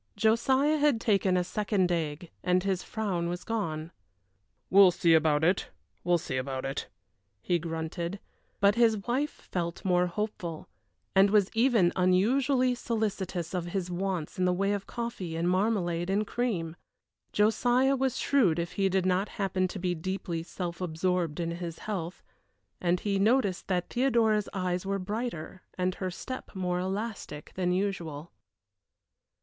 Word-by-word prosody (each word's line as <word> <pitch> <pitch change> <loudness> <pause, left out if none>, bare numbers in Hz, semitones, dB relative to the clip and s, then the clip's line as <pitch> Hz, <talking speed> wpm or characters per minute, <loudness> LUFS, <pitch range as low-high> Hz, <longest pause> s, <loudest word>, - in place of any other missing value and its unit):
Josiah 260 +8 +3
had 290 -5 +3
taken 195 -4 +2
a 180 - +2
second 190 -1 0
egg 160 0 -2
and 180 0 +2
his 190 -2 0
frown 190 -6 -2
was 175 +1 -4
gone. 165 -8 -3 0.8
"We'll 195 0 +8
see 170 -1 +3
about 155 -1 +3
it, 180 +4 +2 0.3
we'll 175 0 +3
see 155 -6 -4
about 130 0 -3
it," 135 0 -3 0.5
he 175 - 0
grunted; 170 +3 -4 0.4
but 200 0 +5
his 230 -1 +4
wife 265 +5 0
felt 170 -1 -5
more 180 -1 +3
hopeful, 175 -4 -4 0.5
and 195 +1 +6
was 205 -2 +3
even 225 -6 +3
unusually 250 +8 +3
solicitous 200 -7 -2
of 180 -2 -1
his 180 0 -3
wants 180 -2 -3
in 185 - +3
the 180 - +3
way 195 +2 +1
of 200 -1 -4
coffee 235 -8 -4
and 165 +1 0
marmalade 180 -3 +1
and 205 +2 +1
cream. 195 -9 -2 0.6
Josiah 245 +5 +3
was 265 -1 0
shrewd 215 - +3
if 170 0 -2
he 195 -1 +1
did 190 0 +1
happen 185 0 0
to 185 - -7
be 180 -1 -1
deeply 175 0 -3
self 170 +1 -5
absorbed 175 -1 -1
in 170 -1 -1
his 170 -1 -5
health, 180 -5 -5 0.6
and 175 0 +1
he 200 -2 0
noticed 205 -3 +2
that 180 -2 -1
Theodora's 230 -5 +2
eyes 180 -2 -1
were 195 0 -1
brighter 195 -3 -4 0.2
and 185 0 0
her 185 0 -3
step 255 +6 -7
more 180 -1 -1
elastic 190 -5 -4
than 180 -1 0
usual. 175 -5 -2
185 Hz, 150 wpm, -29 LUFS, 175-215 Hz, 0.8 s, We'll